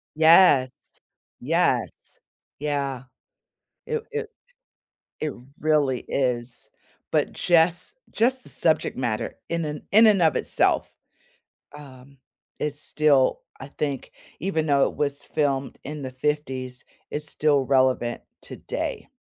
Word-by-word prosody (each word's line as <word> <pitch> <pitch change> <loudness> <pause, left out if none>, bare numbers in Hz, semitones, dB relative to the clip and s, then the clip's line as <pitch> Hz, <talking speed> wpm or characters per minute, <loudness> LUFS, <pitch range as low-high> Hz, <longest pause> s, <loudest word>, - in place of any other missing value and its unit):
Yes, 160 -5 +6 0.7
yes, - - -1 0.4
yeah. 140 -3 -2 0.8
It 460 -1 -3
it 450 -1 -4 0.9
It 155 -3 -2 0.3
really 150 -5 +2
is. 125 -2 -2 0.4
But - - +1
just 170 - +2
just 255 +3 +2
the - - -7
subject 160 -2 +2
matter 120 -4 -2
in 170 0 -1
and 150 0 -5
in 220 +2 +7
and 205 -4 +4
of 160 -3 +3
itself - - +2 0.8
um, 140 -1 -14 0.4
is 145 -1 -2
still 145 -5 +2 0.2
I 135 - -8
think, 140 -2 -4 0.3
even 160 -3 -1
though 140 -2 +3
it - - -12
was 140 -1 -2
filmed 140 -3 -1
in 150 +1 -6
the 130 - -5
‘50s, 130 -2 -3 0.3
it's 150 0 -3
still 145 -2 +2
relevant 130 -3 +1 0.2
today. - - -5
145 Hz, 115 wpm, -24 LUFS, 130-160 Hz, 0.9 s, in